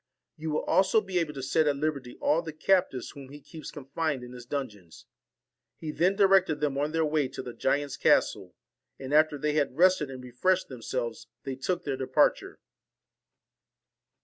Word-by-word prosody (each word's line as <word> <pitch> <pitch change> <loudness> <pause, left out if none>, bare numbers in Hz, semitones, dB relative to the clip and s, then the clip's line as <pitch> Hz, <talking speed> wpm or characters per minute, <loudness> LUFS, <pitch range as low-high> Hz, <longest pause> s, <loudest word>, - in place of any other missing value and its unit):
You 160 +1 -5
will 150 - -1
also 195 +3 +3
be 190 -4 -2
able 155 -3 -2
to 135 - -5
set 150 +4 +2
at 145 - +2
liberty 140 -4 -3
all 155 +3 +2
the 160 -2 -7
captives 170 -5 +1
whom 140 -3 -11
he 145 +1 -11
keeps 155 +2 -10
con 145 -4 -10
fined 145 -2 -2
in 125 0 -10
his 125 -1 -11
dungeons.' 105 - -6 0.7
He 155 - -5
then 180 +5 +2
directed 190 -6 +4
them 145 -2 0
on 145 +2 -1
their 160 0 +1
way 150 -2 +1
to 130 0 -7
the 125 - -7
giant's 140 +2 -1
castle; - - +2 0.4
and 135 +1 -6
after 155 -1 +4
they 150 +1 -1
had 145 -3 0
rested 180 -4 +4
and 130 -1 -8
refreshed 180 +10 0
themselves, 120 -2 -4 0.2
they 135 - -4
took 175 +7 -2
their 140 -2 -2
departure. 130 0 +1
145 Hz, 180 wpm, -28 LUFS, 130-160 Hz, 0.7 s, directed